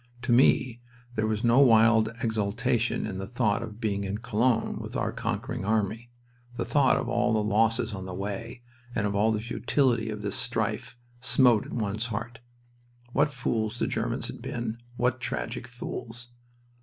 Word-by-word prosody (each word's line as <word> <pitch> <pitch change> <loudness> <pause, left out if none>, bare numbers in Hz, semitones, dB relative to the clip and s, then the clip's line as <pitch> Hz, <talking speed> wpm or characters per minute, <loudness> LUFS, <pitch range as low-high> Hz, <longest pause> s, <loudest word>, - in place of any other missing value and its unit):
To 125 - 0
me 120 -1 +4 0.3
there 110 -2 0
was 110 0 -1
no 120 +2 +5
wild 115 -3 +6
exultation 115 +2 0
in 95 -3 -4
the 95 - -4
thought 115 -2 +1
of 110 -2 -7
being 100 -3 -1
in 100 +1 -2
Cologne 115 +1 +1
with - - -7
our - - 0
conquering - - -3
army. 110 +2 -1 0.5
The - - -1
thought 140 -2 +3
of - - -2
all 120 - +1
the 110 -1 +2
losses 115 +2 +2
on 95 -1 -5
the 95 - -6
way, 105 +5 -5 0.3
and 105 - +1
of 100 - 0
all 105 +2 +3
the 110 - 0
futility 120 0 +1
of 105 -1 -5
this 100 - -1
strife, - - -1 0.2
smote 120 -3 +4
at - - -8
one's 110 +1 -1
heart. 115 +1 -5 0.7
What 145 +2 +3
fools 115 -3 -1
the - - 0
Germans - - -1
had - - -7
been, 115 -1 -4 0.2
what 125 0 +1
tragic 125 0 -3
fools! 120 -1 -6
115 Hz, 170 wpm, -28 LUFS, 105-120 Hz, 0.7 s, wild